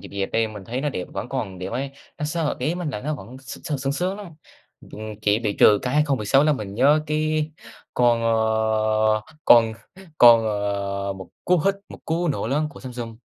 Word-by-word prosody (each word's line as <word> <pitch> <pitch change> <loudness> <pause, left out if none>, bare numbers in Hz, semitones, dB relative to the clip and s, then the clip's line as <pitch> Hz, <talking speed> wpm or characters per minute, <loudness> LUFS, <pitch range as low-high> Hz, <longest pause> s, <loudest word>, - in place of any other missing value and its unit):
dẹp - - -10
dẹp 100 -1 -2
đây 115 -1 +1
mình 105 -3 -9
thấy 125 +5 -3
nó 150 - -1
đẹp, 90 -10 -4
vẫn 95 +5 -5
còn 105 -9 -4
đẹp 95 - -5
ấy, 135 +2 -3 0.3
nó 150 - -2
sờ 155 0 -1
ý 160 +3 -1
mình 175 -4 -3
là 105 - -5
nó 150 +5 -2
vẫn 120 +2 -10
sờ 140 +3 -5
sướng 135 +1 -2
sướng 185 +6 -2
lắm, 200 -5 -9 0.5
ừm, 110 - -11 0.2
chỉ 105 +1 +3
bị 105 -3 -2
trừ 105 -1 +7
cái 125 +2 -2
2016 140 -2 +3
là 155 - +4
mình 105 -7 -5
nhớ 145 +6 +4
cái 155 0 0 0.4
con, 120 -1 +3
ờ, 110 -1 +2 0.2
con 115 -2 +6 0.5
con, 115 -2 +8
ờ, 100 -1 -2
một 95 -2 -10 0.2
cú 180 -1 +3
hích, 195 0 +3
một - - -11
cú 170 +2 0
nổ 140 -6 -1
lớn 150 +3 +1
của - - -13
Samsung. 120 -3 -7
120 Hz, 205 wpm, -23 LUFS, 110-150 Hz, 0.5 s, con